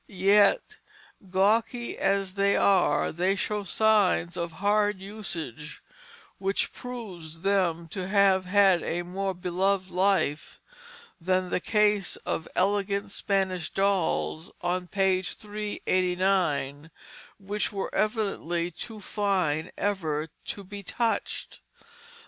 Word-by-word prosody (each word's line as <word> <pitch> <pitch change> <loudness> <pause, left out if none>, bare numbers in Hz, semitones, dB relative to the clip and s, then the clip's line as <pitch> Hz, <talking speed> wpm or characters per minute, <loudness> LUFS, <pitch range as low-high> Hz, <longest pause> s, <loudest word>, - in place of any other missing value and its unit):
Yet 200 - +3 0.5
gawky 220 +6 +1
as 195 -1 0
they 200 0 +2
are, 180 -7 +3
they 180 +4 +1
show 210 +1 -2
signs 200 -4 +2
of 170 -1 -3
hard 205 +1 +1
usage, 175 - -6 0.6
which 195 0 0
proves 185 -10 -8
them 180 -4 +1
to 185 +1 -4
have 195 -1 +4
had 190 -2 +4
a 175 +1 -2
more 190 +2 -3
beloved 185 +1 0
life 185 -5 +1 0.6
than 185 +1 0
the - - +1
case 210 -1 +2
of 160 - -2
elegant 200 +1 0
Spanish 190 -5 -1
dolls, 190 -4 0
on 180 +1 -1
page 190 0 +1
389, 185 -7 -1 0.5
which 205 +1 -2
were 195 -2 -4
evidently 195 -6 -1
too 220 +6 -8
fine 185 -7 0
ever 160 -6 -1 0.2
to 200 - -5
be 200 +1 -8
touched. 230 +4 -2
190 Hz, 110 wpm, -27 LUFS, 175-205 Hz, 0.6 s, have